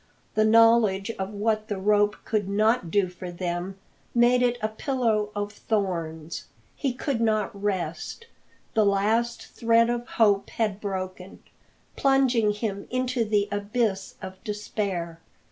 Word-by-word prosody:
The 215 - +3
knowledge 225 -2 +5
of 190 0 -2
what 215 +1 -1
the 205 -3 -3
rope 205 +1 +3
could 210 -3 -1
not 215 -1 +2
do 195 +2 +2
for 180 0 -8
them 175 +2 -4 0.4
made 240 +1 +5
it 245 -1 +2
a 215 - 0
pillow 220 -2 0
of 205 0 -2
thorns. 170 -7 -3 0.3
He 275 - -1
could 250 -1 -2
not 215 -2 +1
rest. 195 - -3 0.5
The 220 - +4
last 215 +4 +1
thread 230 0 +3
of 240 0 -3
hope 205 -3 +2
had 215 -3 -1
broken, 185 -2 -5 0.5
plunging 260 -6 +3
him 205 -1 -4
into 255 -1 0
the 210 -2 +1
abyss 205 -1 -1
of 190 0 -8
despair. 200 -6 -3
210 Hz, 135 wpm, -26 LUFS, 195-230 Hz, 0.5 s, knowledge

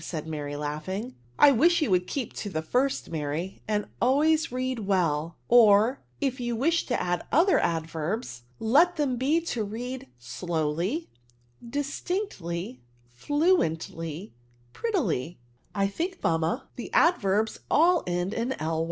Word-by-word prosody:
said 155 -2 -5
Mary, 145 -2 -4
laughing. 155 - -4 0.2
I 290 - +8
widi 335 +7 +4
you 290 - +1
would 180 0 +2
keep 265 -6 -3
to 205 - -5
the 160 -4 -3
first, 255 +7 0
Mary, 160 +4 -3
and 210 -1 0 0.2
always 310 +6 +3
read 255 0 -2
well; 170 -6 0
or, 230 +1 +5 0.2
if 270 -2 -1
you 240 -1 -2
wish 330 +8 +1
to 245 - 0
add 175 -1 -1
other 350 +6 +4
axlverbs, 165 - -2 0.2
let 305 +11 +4
them 280 -6 0
be 280 +7 +2
to 245 -9 -2
read 245 +5 -5
slowly 170 - -2 0.5
f 235 - -11
distinctly 265 - -3 0.3
f 120 - -21
fluently, 170 - 0 0.4
prettily" 205 - -1 0.4
*^ - - -3
I 195 - +4
think, 345 - -3
mamma, 165 0 0
the 245 - -6
adverbs 220 - +2
all 340 +3 +4
end 175 +3 -1
in 240 +3 -1
Zy? 155 - -3
215 Hz, 145 wpm, -27 LUFS, -, 0.5 s, I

